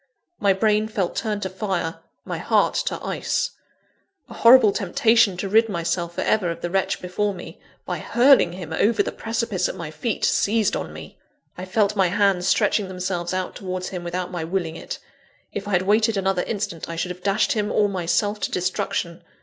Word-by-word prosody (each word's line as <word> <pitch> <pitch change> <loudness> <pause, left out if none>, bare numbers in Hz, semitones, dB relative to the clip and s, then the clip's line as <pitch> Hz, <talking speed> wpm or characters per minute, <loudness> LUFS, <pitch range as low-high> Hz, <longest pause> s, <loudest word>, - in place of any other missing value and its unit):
My 200 -1 +3
brain 210 +2 +2
felt 200 -5 -2
turned 210 -2 -2
to 190 - -2
fire; 185 -4 -3 0.3
my - - -4
heart - - +2
to - - -2
ice. - - -1 0.8
A - - -9
horrible 230 -3 +7
temptation 220 +1 +3
to 195 - -3
rid 220 +3 +4
myself 170 -1 -2
for - - -2
ever 205 -5 +1
of 170 0 -5
the 175 - -3
wretch 195 0 0
before 200 +3 -1
me, 175 - -10 0.3
by - - -3
hurling 245 -8 +4
him 175 -3 -7
over 210 +6 +2
the - - -3
precipice 225 -4 -2
at - - -5
my 165 -3 -6
feet, 225 +7 -2
seized 215 -1 +2
on - - -4
me. - - -11 0.4
I 180 - -6
felt 205 +2 +1
my 190 -2 +3
hands 195 -1 +2
stretching 210 0 +2
themselves 180 -2 -3
out 185 0 -3
towards 185 -2 -4
him 180 -2 -6
without 180 +1 -3
my 175 -3 -3
willing 165 -1 -2
it - - -6 0.6
if 205 0 -5
I 205 - -3
had 180 0 +3
waited 215 +2 +2
another 195 -1 +1
instant, 195 -7 -4
I 165 - -4
should 165 +2 -2
have 180 0 -9
dashed 200 +7 +1
him 210 -5 0
or 210 - +3
myself 200 +3 0
to - - -1
destruction. 180 -1 -2
195 Hz, 195 wpm, -23 LUFS, 180-215 Hz, 0.8 s, horrible